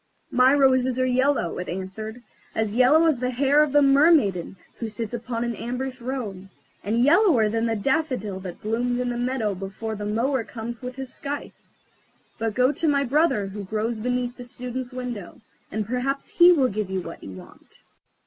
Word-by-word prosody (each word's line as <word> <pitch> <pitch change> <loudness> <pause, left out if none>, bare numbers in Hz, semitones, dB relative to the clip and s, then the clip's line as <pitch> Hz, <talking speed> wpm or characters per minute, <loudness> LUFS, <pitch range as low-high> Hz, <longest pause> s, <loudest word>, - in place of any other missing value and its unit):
"My 255 0 +5
roses 260 -2 +3
are 255 - +3
yellow," 255 - +1
it 180 - -5
answered; 215 +6 -6 0.3
"as 220 -2 -1
yellow 275 +7 +5
as 310 -6 +2
the 250 0 -1
hair 275 +4 +3
of 300 -2 +2
the 290 +1 +5
mermaiden 275 - +4 0.2
who 230 - -3
sits 220 +1 -5
upon 235 0 -3
an 235 -1 -2
amber 250 +3 -3
throne, 235 -7 -6 0.3
and 225 +4 +1
yellower 300 - +4
than 225 +2 0
the 225 - 0
daffodil 250 - -1
that 185 -2 -9
blooms 240 +3 0
in 250 0 -1
the 240 - -2
meadow 245 -4 -1
before 200 +4 -5
the 205 0 -5
mower 235 +4 0
comes 230 +1 -7
with 250 0 -6
his 265 -1 -7
scythe. 285 +1 -5 0.9
But 225 -2 -2
go 255 +2 +4
to 320 - -2
my 280 -2 +3
brother 270 -5 +2
who 200 +1 -6
grows 220 +3 -2
beneath 245 +1 -2
the 245 - -8
Student's 250 +1 -5
window, 250 -6 -6 0.3
and 215 -1 -2
perhaps 255 +4 -2
he 350 +1 +7
will 275 -7 +3
give 210 -1 -3
you 190 -1 -2
what 165 - -9
you 95 - -8
want." 90 - -15
245 Hz, 185 wpm, -24 LUFS, 215-265 Hz, 0.9 s, he